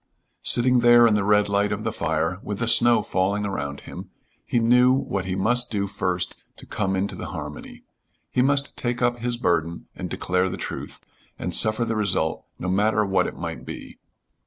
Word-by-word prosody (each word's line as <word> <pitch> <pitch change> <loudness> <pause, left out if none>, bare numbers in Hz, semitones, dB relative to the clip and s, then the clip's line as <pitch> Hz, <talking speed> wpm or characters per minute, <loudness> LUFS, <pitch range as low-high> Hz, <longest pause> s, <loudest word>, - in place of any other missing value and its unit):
Sitting 125 +1 +3
there 120 0 +6
in 115 - +4
the 105 -1 +1
red 105 0 +3
light 100 +1 +1
of 105 0 -3
the 115 - -1
fire 80 -2 -1
with 105 - -5
the 115 - -2
snow 120 -1 +5
falling 100 +1 -1
around 70 -8 -4
him, - - -10 0.4
he - - 0
knew 125 +2 +5
what 100 -8 -2
he 95 0 -2
must 120 +5 +2
do 100 -2 -1
first 90 -3 -2 0.2
to - - -12
come 95 0 -2
into 95 +2 -2
the - - -6
harmony. 75 0 -8 0.5
He 125 - +2
must 140 +1 +1
take 120 0 -2
up 120 0 +1
his 120 0 -2
burden 85 -6 -1
and - - -6
declare 90 +1 0
the - - -5
truth, - - -7 0.4
and - - -4
suffer 110 +2 +3
the 115 - -2
result, 100 -7 0
no 90 - -5
matter 105 +3 +2
what 95 -1 +1
it - - -8
might - - -6
be. - - -9
105 Hz, 195 wpm, -24 LUFS, 95-120 Hz, 0.5 s, there